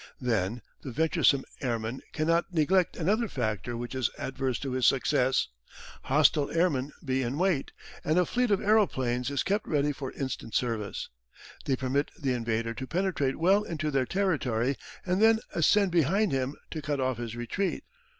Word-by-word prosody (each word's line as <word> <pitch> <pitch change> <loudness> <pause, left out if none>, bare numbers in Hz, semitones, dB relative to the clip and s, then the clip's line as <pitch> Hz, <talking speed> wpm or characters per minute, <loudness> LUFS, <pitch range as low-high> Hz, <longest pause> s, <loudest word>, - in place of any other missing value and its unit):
Then 115 -1 -1 0.2
the 135 - -6
venturesome 140 -1 +3 0.2
airman 120 -1 -2
cannot 165 +4 +1
neglect 175 +2 +2
another 210 +8 +1
factor 115 - -2
which 120 +2 -5
is 130 -4 0
adverse 130 -1 -2
to 135 - -3
his 130 -1 +2
success. 130 - +2 0.6
Hostile 145 +1 +3
airmen 150 -5 +1
lie 135 -4 -2
in 130 +1 -1
wait, 180 -5 +1 0.3
and 155 +3 +1
a 180 - +4
fleet 250 +4 0
of 200 -2 +3
aeroplanes 130 - +2
is 140 -1 0
kept 205 +2 -1
ready 145 -1 +1
for 135 -2 -5
instant 130 -5 -4
service. 115 -5 -2 0.6
They 135 - +2
permit 135 +3 0
the 135 -5 0
invader 115 -1 -1
to 130 +2 -6
penetrate 170 -6 0
well 190 +5 +4
into 155 -6 -3
their 135 -3 +1
territory 140 - 0 0.3
and 185 +2 +1
then 225 0 +6 0.2
ascend 190 +4 +3
behind 175 +6 +2
him 135 +1 -1 0.2
to 155 - -4
cut 145 -1 -2
off 130 -1 0
his 115 -1 -5
retreat. 155 - -2
140 Hz, 165 wpm, -28 LUFS, 125-175 Hz, 0.6 s, then